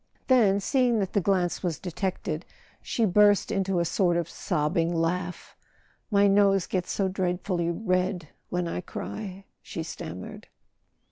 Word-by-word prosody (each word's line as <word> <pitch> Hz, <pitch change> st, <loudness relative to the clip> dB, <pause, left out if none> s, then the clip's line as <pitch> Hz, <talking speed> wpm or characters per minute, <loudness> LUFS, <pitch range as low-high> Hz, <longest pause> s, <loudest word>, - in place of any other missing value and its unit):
Then, 215 Hz, -6 st, +5 dB
seeing 245 Hz, +3 st, +2 dB
that 195 Hz, -3 st, -1 dB
the 200 Hz, -, +2 dB
glance 180 Hz, -2 st, +1 dB
was 175 Hz, -4 st, -1 dB
detected, 180 Hz, -3 st, -3 dB, 0.4 s
she 230 Hz, -, 0 dB
burst 205 Hz, +1 st, +4 dB
into 195 Hz, -2 st, 0 dB
a 170 Hz, -, +1 dB
sort 175 Hz, 0 st, +2 dB
of 170 Hz, -2 st, -1 dB
sobbing 165 Hz, +2 st, 0 dB
laugh. 175 Hz, +2 st, -2 dB, 0.5 s
"My 200 Hz, -1 st, +4 dB
nose 195 Hz, -2 st, +4 dB
gets 180 Hz, -2 st, -2 dB
so 195 Hz, -, +1 dB
dreadfully 180 Hz, -2 st, -1 dB
red 185 Hz, -3 st, -1 dB, 0.2 s
when 180 Hz, -1 st, -1 dB
I 170 Hz, -, -3 dB
cry," 195 Hz, +1 st, -7 dB, 0.2 s
she -, -, -5 dB
stammered. -, -, -8 dB
185 Hz, 140 wpm, -27 LUFS, 175-200 Hz, 0.5 s, Then